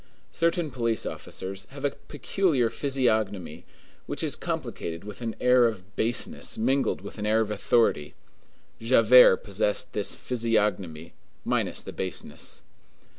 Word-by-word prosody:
Certain 170 -2 0
police 115 -3 -1
officers 95 +1 -6
have 140 +1 -7
a 140 - +2
peculiar 145 - 0
physiognomy, 110 - -1 0.4
which - - -3
is - - +1
complicated 85 +1 -4
with 105 +3 -9
an 115 -2 -3
air 125 -1 +5
of 100 -3 -7
baseness 115 +1 -1
mingled 130 +2 +1
with 100 +2 -9
an 105 - -3
air 110 +1 +3
of 110 -1 0
authority. 105 -7 +1 0.6
Javert 115 -2 +6
possessed 105 +5 -1
this 105 -2 -1
physiognomy 105 -9 -1 0.3
minus - - -1
the - - -8
baseness. 95 -1 -5
110 Hz, 125 wpm, -27 LUFS, 100-125 Hz, 0.6 s, Javert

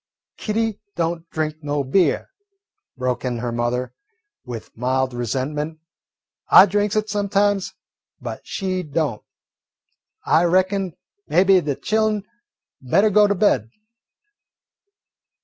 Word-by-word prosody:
"Kitty 220 -1 -1 0.2
don't 165 0 -2
drink 155 -1 -2
no 145 -1 -1
beer," 160 - +1 0.7
broke 125 -1 -2
in 125 -2 -2
her 120 0 -3
mother 120 +2 -2 0.5
with 120 -3 -8
mild 130 +2 0
resentment. 135 +6 -3 0.7
"I 190 - +9
drinks 205 +1 0
it 215 0 +1
sometimes, 205 -1 0 0.5
but - - -6
she 185 -2 -3
don't. 150 -8 -2 1.0
I 160 +3 +4
reckon 185 +1 +1 0.3
maybe 185 +4 +4
de 145 -3 -2
chillen 215 +1 0 0.6
better 195 +12 +3
go 210 +1 +5
to 205 - +1
bed." 180 - +2
165 Hz, 110 wpm, -22 LUFS, 130-200 Hz, 1.0 s, I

